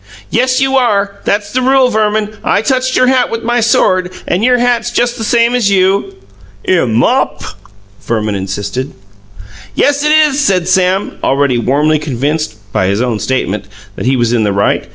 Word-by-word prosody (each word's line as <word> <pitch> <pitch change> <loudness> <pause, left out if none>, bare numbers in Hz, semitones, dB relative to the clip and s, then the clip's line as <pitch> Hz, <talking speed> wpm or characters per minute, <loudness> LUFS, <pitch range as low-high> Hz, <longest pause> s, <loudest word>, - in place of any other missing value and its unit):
"Yes, 255 0 +1
you 270 0 +1
are; 200 -5 0
that's 205 0 -1
the 255 - +1
rule, 260 0 +3
Verman. 215 0 0
I 205 - +1
touched 255 +1 0
your 255 - +4
hat 255 -1 +2
with 230 0 -4
my 240 +1 0
sword, 185 -5 +1 0.2
and 180 +5 0
your 250 +1 +3
hat's 240 -1 0
just 240 0 0
the 225 - -6
same 235 +2 +2
as 240 -5 +1
you." 195 - +1 0.5
"Imm 165 -11 +1
mop!" 120 - +1 0.6
Verman 110 -2 -2
insisted. 100 +6 -4 0.8
"Yes, 285 0 +1
it 300 - +2
is," 305 -2 +3
said 190 -11 +1
Sam, 185 +1 0
already 135 -2 +1
warmly 150 +5 +1
convinced 145 -1 -2 0.2
(by 95 - +1
his 100 +2 0
own 120 -3 -1
statement) 105 -3 -2 0.3
that - - -4
he 135 - +2
was 120 -2 0
in 120 - +1
the 105 -2 +1
right. 100 +1 0
200 Hz, 175 wpm, -13 LUFS, -, 0.8 s, your